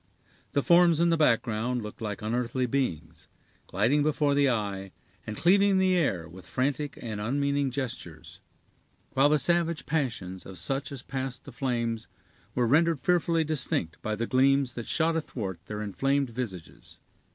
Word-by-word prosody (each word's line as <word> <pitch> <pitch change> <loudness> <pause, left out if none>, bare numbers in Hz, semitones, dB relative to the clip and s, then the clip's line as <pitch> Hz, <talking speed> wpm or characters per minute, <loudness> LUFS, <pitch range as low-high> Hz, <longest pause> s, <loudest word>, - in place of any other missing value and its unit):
The 140 - +2
forms 170 -2 +5
in 170 0 +4
the - - +4
background 120 -4 +1
looked 105 +2 -9
like 105 0 -4
unearthly 120 +3 -1
beings, 85 - -3 0.4
gliding 145 +5 +2
before 150 -1 +2
the 140 -1 +3
eye, 100 -5 -2 0.3
and 110 -1 -5
cleaving 195 +2 +4
the 185 -1 +3
air 95 - 0
with 90 +1 -13
frantic 140 - -1
and 110 -3 -5
unmeaning 140 +4 0
gestures; 130 -2 -6 0.7
while 135 +2 +4
the 150 - +4
savage 170 +3 +1
passions 110 - -2
of 95 - -10
such 135 - -2
as 135 -3 -6
passed 130 -1 -4
the 140 - -10
flames 120 -3 -2 0.5
were 125 - +2
rendered 160 +5 +3
fearfully 170 0 +2
distinct 135 - -2
by 110 0 -2
the 115 +2 -2
gleams 135 +1 +3
that 120 -2 -6
shot 165 0 +1
athwart 105 - -4
their 105 0 -4
inflamed 135 +5 0
visages. 105 -9 -7
130 Hz, 155 wpm, -28 LUFS, 110-150 Hz, 0.7 s, forms